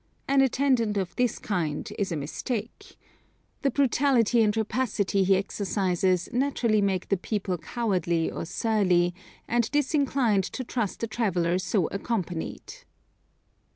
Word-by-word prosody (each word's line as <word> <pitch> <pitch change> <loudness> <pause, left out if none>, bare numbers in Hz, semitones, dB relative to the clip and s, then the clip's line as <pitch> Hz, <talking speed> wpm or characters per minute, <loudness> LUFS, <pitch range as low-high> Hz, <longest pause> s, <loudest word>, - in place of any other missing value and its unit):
An 275 0 +4
attendant 255 -5 +2
of 185 -3 -3
this 245 -2 +1
kind 165 -8 -2
is 195 -3 -1
a - - -1
mistake. 210 - -5 0.6
The 275 - +2
brutality 255 -3 +3
and 215 0 +2
rapacity 215 -4 0
he 190 +1 +4
exercises 185 -2 0
naturally 240 -5 +1
make 190 -2 0
the 195 - +2
people 190 -2 -2
cowardly 175 -4 -1
or - - -5
surly, 180 -3 +1 0.3
and 235 -1 +1
disinclined 275 - +1
to 255 - -5
trust 235 -3 -3
a - - +1
traveller 185 -6 0
so 190 -1 0
accompanied. 190 -5 -4
210 Hz, 125 wpm, -27 LUFS, 185-240 Hz, 0.6 s, An